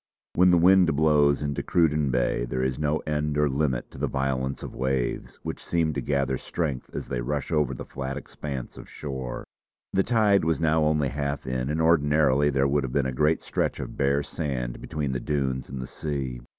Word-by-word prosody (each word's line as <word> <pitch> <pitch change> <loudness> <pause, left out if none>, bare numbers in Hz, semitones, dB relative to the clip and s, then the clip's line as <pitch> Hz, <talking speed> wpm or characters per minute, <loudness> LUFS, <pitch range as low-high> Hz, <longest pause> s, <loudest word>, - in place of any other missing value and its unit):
When 90 +1 +5
the 90 - +5
wind 90 -2 +5
blows 75 -2 +3
into 70 -1 -2
Cruden 75 -4 +2
Bay 60 -1 +1
there 65 +1 -2
is 65 0 -1
no 75 +1 0
end 75 -1 -1
or 75 0 +3
limit 65 -3 -1
to - - -11
the - - 0
violence 65 0 -2
of - - -7
waves, 65 -1 -2
which - - -5
seem 80 -2 0
to 70 - -2
gather 70 -1 0
strength 75 -7 -3
as - - -4
they 60 - -2
rush 70 +4 -3
over 75 -5 +1
the - - -7
flat 70 +1 -5
expanse 70 -2 -6
of - - -11
shore. 65 -4 -5 0.5
The 95 - +4
tide 105 -4 +3
was 80 0 +1
now 80 -1 +3
only 75 -3 +2
half 70 +1 -3
in, 65 0 -2
and 75 +2 -1
ordinarily 75 -3 +4
there 70 -1 +2
would 70 0 +1
have 65 - -3
been 70 -2 +2
a 65 - -1
great 75 +5 +2
stretch - - -1
of - - -6
bare 70 +1 +1
sand 65 -6 -4
between 75 -3 -3
the 65 - -2
dunes 65 -2 -2
and 65 +1 -6
the 65 - -4
sea. 65 -5 -4
70 Hz, 205 wpm, -26 LUFS, 65-75 Hz, 0.5 s, When